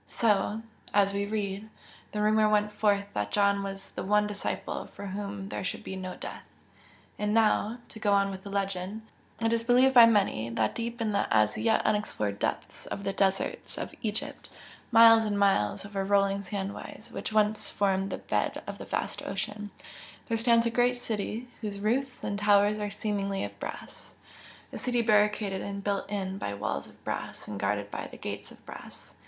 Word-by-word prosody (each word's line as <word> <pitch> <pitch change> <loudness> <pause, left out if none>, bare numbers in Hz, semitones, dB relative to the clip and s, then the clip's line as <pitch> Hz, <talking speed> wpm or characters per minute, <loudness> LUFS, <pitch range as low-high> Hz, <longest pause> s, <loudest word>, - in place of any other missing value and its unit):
So 215 0 +1 0.3
as 200 -1 +4
we 200 0 -1
read 205 0 -3 0.4
the 210 0 -1
rumour 215 0 +4
went 210 0 +2
forth 205 -1 +2
that 105 0 -2
John 200 0 +3
was 195 0 -6
the - - -5
one 210 +2 +3
disciple 210 -1 -3
for 200 - -9
whom 200 0 -5
there - - -4
should 185 - -3
be 190 - -5
no 185 -1 -5
death. - - -7 0.8
And 210 +1 0
now 220 0 +3
to 220 - -10
go 210 -1 +1
on 200 0 +3
with 190 -1 -7
the 200 - -9
legend 195 +1 -2 0.4
it 225 0 +1
is 230 0 +1
believed 250 +3 +5
by 240 -2 +10
many, 195 - +2
that 115 -2 0
deep 235 0 -4
in 220 -2 +1
the 200 - +1
as 105 -1 +4
yet 225 - +2
unexplored 105 - 0
depths - - -3
of 200 - -5
the 195 0 -1
deserts 195 0 0
of - - -5
Egypt 215 -2 -3 0.4
miles 225 -1 +8
and 210 -2 -1
miles 195 - +2
over 200 -1 -3
rolling 200 0 +2
sand 200 0 -3
waves 215 - -9
which - - -4
once 215 0 +2
formed 195 -1 +1
the - - -3
bed - - -1
of - - -7
a - - -6
vast - - -3
ocean, 205 +2 -4 0.6
there 230 - +2
stands 230 0 +4
a 235 - +1
great 245 +1 +3
city 225 +1 -3
whose 205 -2 -4
roofs 250 +5 -1
and 200 - -2
towers 205 0 +4
are 210 0 -2
seemingly 200 -1 -2
of - - -7
brass, - - -8 0.6
a - - -4
city 245 -2 +1
barricaded 210 -2 +2
and 200 0 -5
built 200 -1 -1
in 195 -1 -3
by 100 - -3
walls 100 -9 -3
of - - -19
brass - - -5
and 105 -2 -5
guarded 100 +1 -1
by - - -4
gates - - -6
of - - -16
brass. - - -11
205 Hz, 190 wpm, -29 LUFS, 195-215 Hz, 0.8 s, by